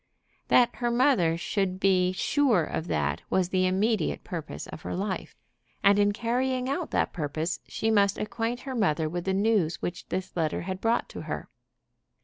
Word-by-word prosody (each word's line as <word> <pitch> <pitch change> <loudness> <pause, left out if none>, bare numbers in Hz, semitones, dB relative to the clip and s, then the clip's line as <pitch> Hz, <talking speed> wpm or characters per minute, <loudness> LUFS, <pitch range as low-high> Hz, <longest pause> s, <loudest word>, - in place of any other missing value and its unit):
That 245 -1 +4
her 240 -1 0
mother 235 - +3
should 185 +1 -1
be 185 -2 +3
sure 230 - +2
of 160 +2 -4
that 75 - -1
was 185 -2 +1
the 185 -1 +2
immediate 195 0 0
purpose 165 -3 -6
of - - -9
her - - -4
life. 190 +1 -3 0.5
And 200 +1 +5
in 205 0 +4
carrying 250 +4 -1
out 305 +5 -2
that - - 0
purpose 155 +1 -2
she 225 - -1
must 200 -2 +3
acquaint 230 +2 -2
her 270 - -5
mother 165 -9 +1
with 175 +3 -4
the 190 - +1
news 200 -5 +2
which 175 +1 -5
this 185 0 -4
letter 160 -3 0
had 185 +1 -5
brought 230 +1 +1
to - - -7
her. - - -5
195 Hz, 175 wpm, -27 LUFS, 175-230 Hz, 0.5 s, And